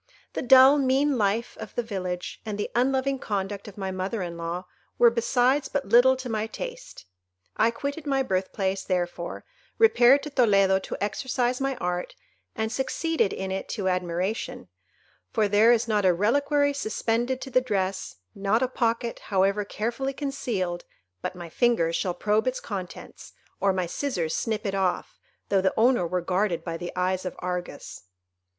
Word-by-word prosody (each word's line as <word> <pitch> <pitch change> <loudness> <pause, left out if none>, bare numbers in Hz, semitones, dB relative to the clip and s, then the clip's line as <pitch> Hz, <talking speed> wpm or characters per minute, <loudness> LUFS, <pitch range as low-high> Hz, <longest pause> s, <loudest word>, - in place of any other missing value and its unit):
The - - -2
dull, 265 +3 +7
mean 275 +2 +2
life 215 +3 0
of - - -8
the 240 - 0
village, 185 -5 -5
and 215 -3 -4
the 205 - -3
unloving 265 +2 +1
conduct 200 -2 -3
of 210 - -11
my 190 -1 -3
mother 190 +2 -3
in 170 -1 -5
law, 170 +2 -4 0.3
were 235 -1 +6
besides 245 +4 +2
but 285 -1 -2
little 255 +2 +6
to 260 0 -6
my 220 -2 -2
taste. - - -8 0.5
I 225 - +3
quitted 285 +6 -5
my 270 -1 +2
birthplace, 190 -2 -1
therefore, 175 -2 -3 0.3
repaired 275 - +6
to 300 - -6
Toledo 200 -7 +4
to - - -6
exercise 250 +4 -1
my 270 0 0
art, 180 -6 -3 0.4
and 220 0 -2
succeeded 270 - 0
in 190 0 -4
it 190 - -4
to 190 -3 0
admiration; 180 +3 -2 0.6
for 220 -4 +1
there 210 +3 +5
is 235 0 +2
not 210 -2 +1
a 185 -2 +4
reliquary 285 - +2
suspended 240 0 -1
to 265 - -7
the 255 - +4
dress, 195 -5 -2 0.2
not 200 +5 +1
a - - +2
pocket, 235 -1 -1
however 195 +1 +2
carefully 235 +7 -3
concealed, 230 -11 -3 0.4
but - - -4
my 175 -1 -8
fingers 170 -3 +1
shall 180 0 -1
probe 215 +5 +1
its 255 - 0
contents, 190 -4 -8 0.3
or 200 - +3
my 185 -1 -1
scissors 175 - -2
snip 220 -2 -2
it 195 - -1
off, 190 -2 -1 0.3
though 195 -1 +3
the 190 0 +1
owner 235 -5 +3
were 180 +1 -1
guarded 180 0 0
by 165 -2 -4
the 175 +1 -5
eyes 185 0 0
of 180 - -5
Argus. 180 - -5
215 Hz, 170 wpm, -26 LUFS, 185-255 Hz, 0.6 s, dull